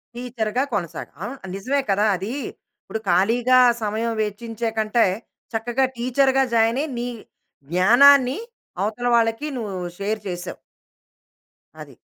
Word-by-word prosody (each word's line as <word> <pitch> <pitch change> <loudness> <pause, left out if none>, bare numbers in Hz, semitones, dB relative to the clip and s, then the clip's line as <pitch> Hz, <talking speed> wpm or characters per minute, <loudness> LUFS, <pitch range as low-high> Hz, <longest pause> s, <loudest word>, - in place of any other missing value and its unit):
టీచర్‌గా 245 0 -2
కొనసాగ్ 175 -6 -4
ఆహ్, 270 +6 -6 0.2
నిజమే 270 +8 -1
కదా. 205 +2 +2
అది 195 +6 -5 0.5
ఇప్పుడు 220 - -5
ఖాళీగా 235 +8 +4 0.2
సమయం 220 +2 -1
వెచ్చించే 225 +2 -4
కంటే, 220 +2 +2 0.5
చక్కగా 240 +4 0
టీచర్‌గా 265 +2 +2
జాయిన్ 230 +3 +3
అయ్యి 305 -4 -5
నీ 240 - -3 0.6
జ్ఞానాన్ని 250 - +6 0.5
అవతల 225 +4 -2
వాళ్ళకి 225 +5 +1
నువ్వు 210 -5 -4 0.2
షేర్ 210 +2 -2
చేసావు. 175 0 -5 1.3
అది. - - -11
230 Hz, 115 wpm, -22 LUFS, 210-250 Hz, 1.3 s, జ్ఞానాన్ని